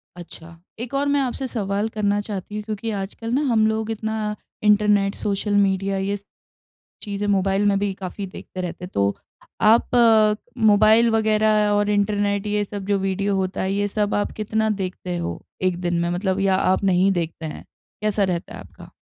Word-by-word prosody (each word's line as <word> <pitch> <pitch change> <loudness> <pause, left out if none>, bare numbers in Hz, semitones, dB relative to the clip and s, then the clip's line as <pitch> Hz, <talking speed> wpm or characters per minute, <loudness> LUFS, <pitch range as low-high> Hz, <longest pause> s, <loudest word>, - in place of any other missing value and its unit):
अच्छा। 170 -1 -12 0.2
एक 245 +3 -6
और 280 +1 +1
मैं 285 0 +2
आपसे 265 0 -2
सवाल 205 -2 -2
करना 205 -2 0
चाहती 205 0 -6
हूँ 210 - -4
क्योंकि 220 +1 -4
आजकल 225 +4 -6
ना 270 - +2
हम 220 -2 +4
लोग 220 0 -1
इतना 220 -1 -3 0.3
इंटरनेट, 210 -1 +3
सोशल 205 +1 -2
मीडिया 195 -1 +2
ये 200 +1 -1 0.9
चीज़ें 205 0 -3
मोबाइल 195 0 +1
में 200 -1 +3
भी 200 -1 -1
काफ़ी 190 +1 -6
देखते 185 0 -8
रहते, 180 0 -5
तो 100 - 0 0.5
आप 225 +3 +4 0.7
मोबाइल 215 +3 +5
वगैरह 215 -1 +3
और 205 0 +2
इंटरनेट, 205 0 0
ये 210 0 0
सब 200 -1 -6
जो 200 0 +1
वीडियो 195 +1 -1
होता 190 0 -2
है 190 +1 -1
ये 205 0 0
सब 210 0 -1
आप 205 - -1
कितना 220 +1 0
देखते 180 -1 -4
हो 170 - -4 0.2
1 185 -2 +1
दिन 175 -1 0
में? 170 - 0
मतलब 185 +2 -1
या 195 -1 +2
आप 185 +1 +1
नहीं 190 0 +3
देखते 165 -2 -3
हैं? 155 - -7 0.4
कैसा 210 -1 +1
रहता 175 -3 -2
है - - -9
आपका? - - -14
205 Hz, 180 wpm, -22 LUFS, 190-215 Hz, 0.9 s, मोबाइल